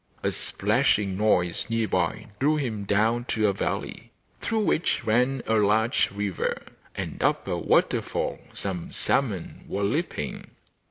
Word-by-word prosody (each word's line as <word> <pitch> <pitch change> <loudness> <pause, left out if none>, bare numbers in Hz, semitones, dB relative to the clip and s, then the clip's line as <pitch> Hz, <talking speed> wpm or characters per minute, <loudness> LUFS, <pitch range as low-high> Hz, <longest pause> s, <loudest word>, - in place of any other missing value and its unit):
A - - +2
splashing 105 -2 +1
noise 90 -4 +1
near 115 -1 +1
by 90 -4 0
drew 150 +3 +3
him 115 -9 -2
down 110 +4 +2
to 110 -3 0
a 100 - +2
valley 95 - -3 0.3
through 225 -1 0
which 170 - +1
ran 125 +4 +2
a 110 - +1
large 110 +2 +3
river, 100 -2 -2 0.3
and - - -4
up - - +1
a - - 0
waterfall - - +1 0.2
some 90 -4 -4
salmon 105 -11 -1
were 100 - -2
leaping. 100 - -2
110 Hz, 140 wpm, -26 LUFS, 100-120 Hz, 0.3 s, drew